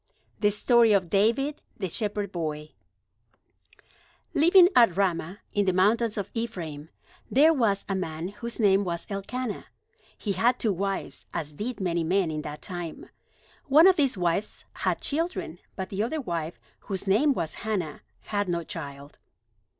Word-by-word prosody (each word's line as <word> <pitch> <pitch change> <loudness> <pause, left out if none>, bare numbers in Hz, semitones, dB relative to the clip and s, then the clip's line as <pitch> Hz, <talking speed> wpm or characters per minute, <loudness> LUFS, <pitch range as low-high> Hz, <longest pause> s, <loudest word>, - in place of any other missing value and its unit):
THE 205 - +4
STORY 230 +2 +4
OF 185 -4 +1
DAVID, 235 +9 +2 0.2
THE 190 - -2
SHEPHERD 205 +1 -2
BOY 155 -3 -4 1.6
Living 350 +4 +7
at 230 -8 +5
Ramah, 185 0 -1
in 205 -1 +2
the 185 - +3
mountains 215 +4 +2
of 200 -1 -4
Ephraim, 170 -10 -5 0.4
there 305 +5 +5
was 220 -8 +1
a 195 - -1
man 170 -2 -3
whose 235 +4 -7
name 200 -2 +4
was 170 -3 -3
Elkanah. 210 +4 -4 0.5
He 205 - -3
had 235 +6 +2
two 220 -5 0
wives, 195 +1 -3
as 150 -2 -3
did 220 +8 -5
many 170 -3 0
men 180 0 +1
in 155 0 -3
that 150 0 -8
time. 175 -3 -7 0.5
One 300 +4 +6
of 380 -1 +7
these 275 -7 +2
wives 175 +3 -1
had - - -1
children, 295 - -2 0.2
but 190 - -5
the 195 +1 -2
other 250 +8 -1
wife, 170 - -4 0.2
whose 195 -2 -5
name 215 +10 +4
was 160 - -2
Hannah, 195 -9 -3 0.2
had 205 -2 -2
no 170 -1 -1
child. 140 -1 -8
200 Hz, 155 wpm, -27 LUFS, 170-230 Hz, 1.6 s, Living